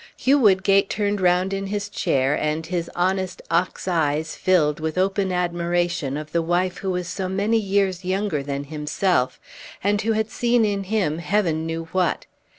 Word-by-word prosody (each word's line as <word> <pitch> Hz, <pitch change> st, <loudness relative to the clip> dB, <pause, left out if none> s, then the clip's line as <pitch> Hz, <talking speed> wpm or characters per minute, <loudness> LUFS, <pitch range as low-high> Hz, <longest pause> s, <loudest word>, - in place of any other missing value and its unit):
Hugh 280 Hz, +3 st, +3 dB
Woodgate 195 Hz, -3 st, +4 dB
turned 205 Hz, -1 st, -1 dB
round 180 Hz, +1 st, +2 dB
in 195 Hz, 0 st, -3 dB
his 205 Hz, 0 st, -3 dB
chair, 135 Hz, -9 st, +1 dB
and 155 Hz, +2 st, -1 dB
his 170 Hz, 0 st, -3 dB
honest 185 Hz, +1 st, 0 dB
ox 175 Hz, +3 st, 0 dB
eyes 155 Hz, -3 st, 0 dB
filled 155 Hz, -6 st, +2 dB
with 160 Hz, +2 st, -3 dB
open 190 Hz, 0 st, +1 dB
admiration 175 Hz, -4 st, -1 dB
of 155 Hz, 0 st, -7 dB
the 170 Hz, -, +1 dB
wife 175 Hz, +2 st, 0 dB
who 195 Hz, -, -3 dB
was 180 Hz, -1 st, -2 dB
so 190 Hz, -1 st, -3 dB
many 205 Hz, +4 st, +1 dB
years 195 Hz, -3 st, 0 dB
younger 185 Hz, -4 st, -1 dB
than 140 Hz, 0 st, -4 dB
himself, 150 Hz, -1 st, -1 dB, 0.4 s
and 205 Hz, +1 st, +2 dB
who 225 Hz, +2 st, +1 dB
had 220 Hz, 0 st, -1 dB
seen 240 Hz, -2 st, +2 dB
in 200 Hz, -2 st, -1 dB
him 185 Hz, -6 st, 0 dB
Heaven 170 Hz, -4 st, 0 dB
knew 165 Hz, 0 st, -3 dB
what! 185 Hz, -2 st, 0 dB
185 Hz, 170 wpm, -23 LUFS, 165-200 Hz, 0.4 s, Woodgate